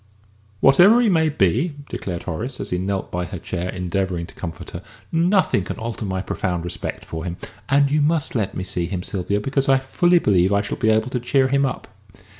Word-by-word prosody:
"Whatever 180 - +7
he 240 -3 +3
may 160 -4 +3
be," 145 - +1
declared 90 -3 -5
Horace, 125 +11 -4
as - - -5
he 90 - 0
knelt 95 +1 -3
by 90 0 -2
her 90 - -6
chair 90 +2 -4
endeavouring 90 -1 -2
to - - -14
comfort 85 -2 -7
her, 85 - -6 0.3
"nothing 170 - +2
can - - -5
alter 115 -1 -4
my 95 -1 -2
profound 90 -4 -2
respect 90 - -5
for 80 -1 -6
him. 85 0 -4 0.3
And 140 0 +3
you 150 0 +3
must 155 0 +1
let 110 -6 -1
me 95 - -2
see 90 -2 -2
him, 90 -1 -4
Sylvia; 100 +2 -2
because 135 +5 0
I 135 - +6
fully 175 +7 +2
believe 95 - +3
I 100 0 +2
shall - - -4
be 110 - +2
able 110 +3 +2
to 125 - -1
cheer 130 +2 +2
him 140 0 +2
up." 130 - -5
105 Hz, 215 wpm, -22 LUFS, 90-140 Hz, 0.3 s, Whatever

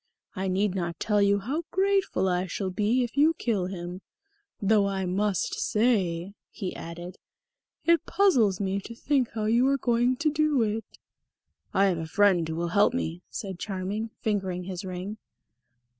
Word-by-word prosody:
I 190 0 -2
need 190 +1 +1
not 170 -3 -3
tell 210 -2 +2
you 200 0 +4
how 260 +11 -2
grateful 385 - +1
I 180 0 0
shall 190 +2 -3
be 215 +7 +1
if 240 - -5
you 310 +3 +4
kill 205 -10 -1
him. 180 0 -6 0.6
Though 205 -1 +3
I 195 -1 -2
must 195 +2 0
say," 195 -6 +1 0.2
he 190 -4 -5
added, 175 +2 -8 0.7
"it 335 0 +3
puzzles 245 - +3
me 195 0 -1
to 230 +4 -9
think 265 -1 +1
how 215 -1 -2
you 235 +4 +3
are 275 0 +3
going 240 0 +2
to 305 +4 +1
do 305 -4 +2
it." 220 +1 -4 0.7
"I 195 - +3
have 180 -4 +1
a 160 - -4
friend 180 -3 +3
who 160 - -3
will 170 +1 -2
help 205 +7 +3
me," 175 -8 -3
said 190 -4 -6
Charming, 200 +3 -3
fingering 190 -4 -2
his 185 +1 -5
ring. 185 +3 -5
200 Hz, 170 wpm, -27 LUFS, 185-235 Hz, 0.7 s, you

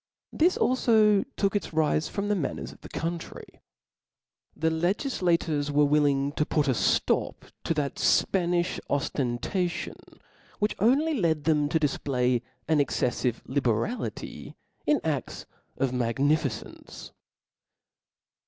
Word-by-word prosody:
This 350 +4 +3
alfo 220 -5 +4
took 200 0 +1
its 205 - -2
rile 155 -1 +2
from 200 +5 -3
the 210 - +2
manners 160 -8 -3
of - - -17
the - - -11
country. 165 0 -6 0.9
The 160 0 0
legiflators 170 - 0
were 145 0 +4
willing 145 -1 +2
to 150 - 0
put 150 -1 0
a 130 - +3
flop - - 0 0.2
to 165 - 0
th^ 145 -2 -2
Spanilh 175 -1 +2
oftentation, 140 - -1 0.6
which 210 0 0
only 275 +10 +3
led 165 - +1
them 150 -2 +2
to 160 - +1
difplay 130 -4 0 0.3
an 155 -1 +3
exceffive 125 -3 0
liberality 130 - -2 0.3
in 300 -2 +4
a£ts 150 -4 -3 0.3
of 135 -2 0
magnificence. 135 +3 -2
155 Hz, 115 wpm, -27 LUFS, 140-190 Hz, 0.9 s, alfo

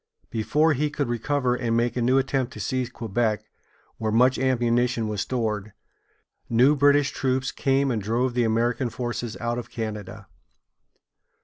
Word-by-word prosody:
Before 145 +9 +2
he 150 +2 0
could 145 -2 -2
recover 125 +2 0
and 120 -2 0
make 120 0 0
a 125 - -1
new 125 +3 +3
attempt 130 -1 0
to - - -9
seize 125 +3 -2
Quebec, 110 -2 -1 0.6
where 110 -1 -1
much 125 +4 +4
ammunition 120 -2 +1
was 105 -2 -2
stored, 110 -4 -2 0.8
new 125 +6 +5
British 145 0 +4
troops 130 0 -1
came 135 0 +1
and 110 -3 -1
drove 120 +5 0
the 120 0 +1
American 120 +2 +1
forces 120 -1 -4
out 120 +1 -2
of 120 - -8
Canada. 105 -3 -6
120 Hz, 150 wpm, -25 LUFS, 115-130 Hz, 0.8 s, new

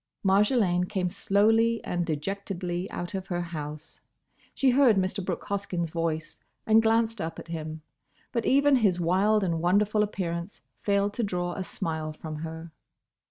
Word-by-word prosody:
Marjolaine 195 -2 +3
came 185 -3 -1
slowly 220 +4 +3
and 175 0 -2
dejectedly 180 +2 -3
out 175 +2 -5
of 190 -1 -4
her 175 -1 -2
house. 155 -2 -7 0.5
She 265 -2 +3
heard 255 -3 +5
Mr. 190 +1 -1
Brooke 180 -2 -3
Hoskyn's 185 -5 -3
voice 160 -2 -2 0.3
and 220 +1 +5
glanced 225 0 +2
up 160 0 -4
at - - -10
him, 155 -1 -5 0.5
but 235 - -1
even 280 0 +4
his 195 -7 +2
wild 195 +5 +3
and 165 -3 0
wonderful 205 +4 +3
appearance 180 -3 -3 0.2
failed 200 0 +1
to 235 - -2
draw 180 -3 -2
a 190 - -4
smile 160 -3 -3
from 155 0 -7
her. 160 +1 -7
185 Hz, 155 wpm, -27 LUFS, 170-210 Hz, 0.5 s, heard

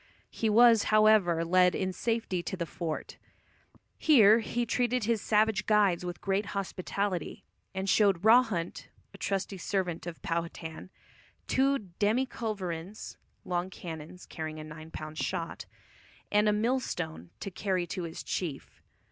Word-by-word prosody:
He 225 - -1
was, 230 0 +6
however, 215 -6 +4
led 180 +1 +4
in 185 -1 -1
safety 225 -3 -1
to 190 - -5
the 170 - -2
fort. 165 -1 -5 0.8
Here 225 -8 +6
he 240 +2 -2
treated 245 +1 0
his 225 -1 +1
savage 215 -1 +2
guides 205 -5 +3
with 175 -1 -5
great 195 +1 0
hospitality, 195 -2 -3 0.3
and 190 +1 -2
showed 195 -3 +3
Rawhunt, 220 -7 +3 0.3
a 200 - -13
trusty 195 -1 -2
servant 180 -3 -2
of 170 - -6
Powhatan, 165 0 -4 0.6
two 275 +1 +2 0.2
demi 220 +6 +2
culverins 200 -5 -5 0.3
(long 180 0 -1
cannons 170 -1 -9
carrying 155 -1 -6
a - - -6
nine 155 +1 -10
pound 155 -1 -7
shot) 170 -3 -3 0.6
and 210 +1 +4
a - - +4
mill 230 +5 +1
stone 80 - -5
to 195 - -5
carry 185 -1 -1
to 175 +2 -5
his 165 -1 -6
chief. 155 -8 -5
190 Hz, 140 wpm, -30 LUFS, 170-215 Hz, 0.8 s, was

